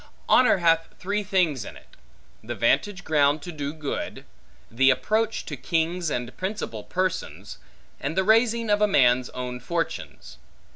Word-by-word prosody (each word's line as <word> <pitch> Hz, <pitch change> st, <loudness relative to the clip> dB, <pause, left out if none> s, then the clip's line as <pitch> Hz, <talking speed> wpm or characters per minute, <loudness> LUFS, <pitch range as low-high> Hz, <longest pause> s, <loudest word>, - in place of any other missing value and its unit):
Honor 250 Hz, -5 st, +5 dB
hath 165 Hz, -2 st, +3 dB
three 205 Hz, +3 st, -2 dB
things 180 Hz, -, +1 dB
in -, -, -10 dB
it: -, -, -19 dB, 0.5 s
the 120 Hz, +2 st, -5 dB
vantage 180 Hz, -, +1 dB
ground 145 Hz, -2 st, +2 dB
to 175 Hz, -, -6 dB
do 145 Hz, -3 st, -4 dB
good; 155 Hz, -2 st, -5 dB, 0.5 s
the 135 Hz, +4 st, +4 dB
approach 215 Hz, -, 0 dB
to 150 Hz, -, -5 dB
kings 165 Hz, +4 st, -1 dB
and 125 Hz, -3 st, -4 dB
principal 185 Hz, -, -4 dB
persons; 105 Hz, -, -3 dB, 0.4 s
and 155 Hz, +5 st, -4 dB
the 190 Hz, -, +3 dB
raising 225 Hz, +1 st, +3 dB
of 205 Hz, 0 st, +2 dB
a 210 Hz, -, +5 dB
man's 125 Hz, -9 st, +3 dB
own 125 Hz, -1 st, -5 dB
fortunes. 165 Hz, +7 st, -5 dB
165 Hz, 150 wpm, -25 LUFS, 130-195 Hz, 0.5 s, Honor